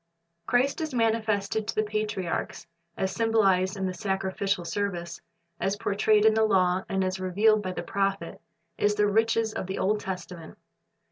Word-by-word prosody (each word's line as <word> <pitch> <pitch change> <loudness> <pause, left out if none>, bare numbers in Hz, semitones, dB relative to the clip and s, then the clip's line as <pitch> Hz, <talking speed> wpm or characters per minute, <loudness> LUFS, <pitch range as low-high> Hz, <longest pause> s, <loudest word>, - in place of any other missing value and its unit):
Christ 260 +5 +1
as 310 -4 -3
manifested 220 -2 0
to - - -3
the 215 - +2
patriarchs, 210 -4 -3 0.3
as 190 0 -1
symbolized 195 -4 +2
in 190 - -2
the 185 - -2
sacrificial 190 -2 -2
service, 175 -2 -3 0.4
as 195 +1 0
portrayed 210 +1 +2
in 220 - +6
the 220 0 +3
law, 185 -3 +2
and 190 0 0
as 185 0 -2
revealed 205 +4 +3
by 185 -2 -4
the 175 - -5
prophets, 195 -2 -2 0.4
is 205 0 +2
the 210 0 +3
riches 225 +1 +1
of 185 - -4
the 190 - -4
Old 210 +2 +1
Testament. 180 -4 -7
200 Hz, 160 wpm, -27 LUFS, 185-215 Hz, 0.4 s, in